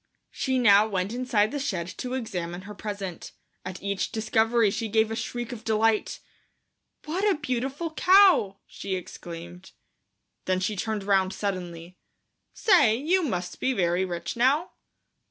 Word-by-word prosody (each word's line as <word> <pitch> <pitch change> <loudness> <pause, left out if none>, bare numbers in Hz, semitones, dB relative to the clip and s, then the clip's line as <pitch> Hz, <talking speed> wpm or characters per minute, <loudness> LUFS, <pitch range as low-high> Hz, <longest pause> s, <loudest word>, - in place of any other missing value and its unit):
She 260 -1 -1
now 210 -3 +6
went 195 0 -2
inside 240 -4 +1
the 290 - -3
shed 185 -11 -2
to 255 0 -3
examine 180 -8 -4
her 205 +2 -9
present. 200 -4 -6 0.3
At 185 0 -7
each 200 -1 -2
discovery 225 0 +2
she 225 - -3
gave 220 +1 +2
a - - -2
shriek 240 +1 -4
of 230 -3 -8
delight. 220 -1 +1 0.8
"What 345 +6 -2
a 385 - +1
beautiful 275 +3 -3
cow," 365 - +5
she 190 - -5
exclaimed. 175 0 -9 0.7
Then 185 0 +1
she 200 +3 -1
turned 215 +1 -3
round 195 -1 +2
suddenly. 180 -3 -5 0.5
"Say, 345 - +4
you 330 +10 +1
must 180 - -3
be 260 - +1
very 180 -3 +1
rich 170 -2 -4
now?" 270 +8 +2
215 Hz, 145 wpm, -26 LUFS, 185-250 Hz, 0.8 s, now